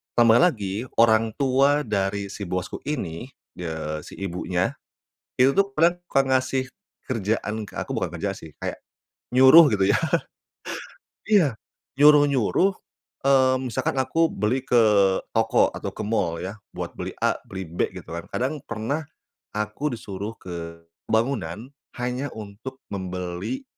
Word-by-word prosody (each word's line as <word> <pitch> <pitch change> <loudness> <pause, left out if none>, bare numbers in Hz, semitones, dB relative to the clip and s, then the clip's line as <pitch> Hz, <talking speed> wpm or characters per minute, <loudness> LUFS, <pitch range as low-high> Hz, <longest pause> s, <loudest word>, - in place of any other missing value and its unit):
...tambah 115 -1 +6
lagi 110 - +1
orang 110 -1 +4
tua 140 +2 +3
dari 100 -3 -1
si 100 -2 -6
bosku 90 +1 -3
ini, 120 - -3 0.3
eee, 80 -2 -4
si - - -11
ibunya, 90 -1 -2 0.7
itu 135 +2 +6
tuh 200 0 +2
kadang 170 +3 +4
suka 135 - +2
ngasih, 130 0 +1 0.4
kerjaan 110 -2 -1
ke 105 - -13
aku - - -4
bukan - - -2
kerjaan - - -3
sih 80 - -11
kayak, - - -3 0.6
nyuruh 130 +5 +9
gitu 95 -2 +2
ya. - - +4 1.3
Iya, 170 - +3 0.4
nyuruh-nyuruh 145 - +5 0.6
eee, 130 -1 +5
misalkan 130 +3 -1
aku 160 +5 +2
beli 115 +6 0
ke 120 - +4 0.6
toko 115 0 +4
atau - - -4
ke 110 - -5
mall 85 -7 0
ya, 95 +3 -5 0.2
buat - - -5
beli - - -5
A - - +3
beli 95 -2 -6
B 85 +2 -1
gitu - - -15
kan. 85 - -6
Kadang 140 +4 -1
pernah, 115 +8 -3 0.5
aku 105 +8 -2
disuruh 100 0 -6
ke 85 -2 -7 0.3
bangunan 110 -3 0 0.3
hanya 125 +3 -2
untuk 110 +5 -8
membeli, 90 - -4
115 Hz, 135 wpm, -24 LUFS, 95-135 Hz, 1.3 s, nyuruh